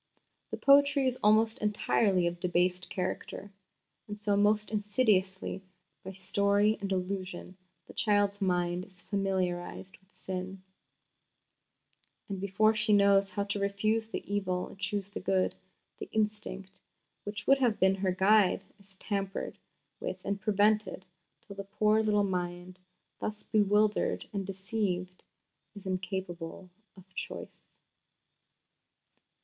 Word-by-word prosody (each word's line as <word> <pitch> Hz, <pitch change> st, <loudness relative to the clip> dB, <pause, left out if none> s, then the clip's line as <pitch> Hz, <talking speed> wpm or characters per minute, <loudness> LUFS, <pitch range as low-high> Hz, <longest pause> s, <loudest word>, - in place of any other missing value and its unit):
The -, -, -4 dB
poetry 280 Hz, 0 st, +5 dB
is 255 Hz, 0 st, -1 dB
almost 220 Hz, +1 st, +4 dB
entirely 205 Hz, -3 st, +2 dB
of 170 Hz, 0 st, -1 dB
a -, -, -31 dB
debased 180 Hz, 0 st, 0 dB
character; 190 Hz, +2 st, -4 dB, 0.6 s
and 210 Hz, 0 st, -6 dB
so 205 Hz, -1 st, +1 dB
most 210 Hz, +1 st, +2 dB
insidiously, 205 Hz, -3 st, +1 dB, 0.4 s
by 190 Hz, -, -6 dB
story 200 Hz, +2 st, +2 dB
and 195 Hz, -1 st, -3 dB
allusion, 185 Hz, -1 st, -3 dB, 0.3 s
the -, -, -13 dB
child's 205 Hz, -1 st, +1 dB
mind 180 Hz, -1 st, 0 dB
is 185 Hz, -3 st, -12 dB
familiarised 190 Hz, -2 st, -2 dB
with 190 Hz, +1 st, -33 dB
sin; 185 Hz, 0 st, -6 dB, 1.6 s
and 195 Hz, -2 st, -5 dB
before 205 Hz, +3 st, +3 dB
she 215 Hz, 0 st, +2 dB
knows 200 Hz, -1 st, +5 dB
how 200 Hz, -, -2 dB
to 205 Hz, 0 st, -3 dB
refuse 215 Hz, +3 st, 0 dB
the 225 Hz, -, -5 dB
evil 190 Hz, -3 st, -2 dB
and 195 Hz, -, -14 dB
choose 200 Hz, 0 st, -3 dB
the -, -, -5 dB
good, 190 Hz, -1 st, +1 dB, 0.5 s
the -, -, -7 dB
instinct 210 Hz, -3 st, -3 dB, 0.4 s
which 205 Hz, 0 st, -5 dB
would 275 Hz, 0 st, +5 dB
have 240 Hz, -5 st, +2 dB
been 190 Hz, 0 st, +5 dB
her 190 Hz, -1 st, 0 dB
guide 195 Hz, +1 st, +4 dB, 0.2 s
is 195 Hz, -1 st, -22 dB
tampered 195 Hz, -1 st, -3 dB, 0.4 s
with -, -, -4 dB
and 200 Hz, 0 st, -2 dB
perverted, 205 Hz, -1 st, +2 dB, 0.4 s
till 220 Hz, -4 st, -11 dB
the 200 Hz, -, -5 dB
poor 210 Hz, +2 st, +2 dB
little 210 Hz, -1 st, +2 dB
mind, 180 Hz, -1 st, -3 dB, 0.4 s
thus 215 Hz, 0 st, -4 dB
bewildered 210 Hz, 0 st, +2 dB
and 195 Hz, -2 st, -3 dB
deceived, 190 Hz, -2 st, -3 dB, 0.5 s
is 200 Hz, -1 st, -11 dB
incapable 185 Hz, -2 st, -4 dB, 0.3 s
of 185 Hz, -, -14 dB
choice. -, -, -7 dB
200 Hz, 130 wpm, -30 LUFS, 185-210 Hz, 1.6 s, poetry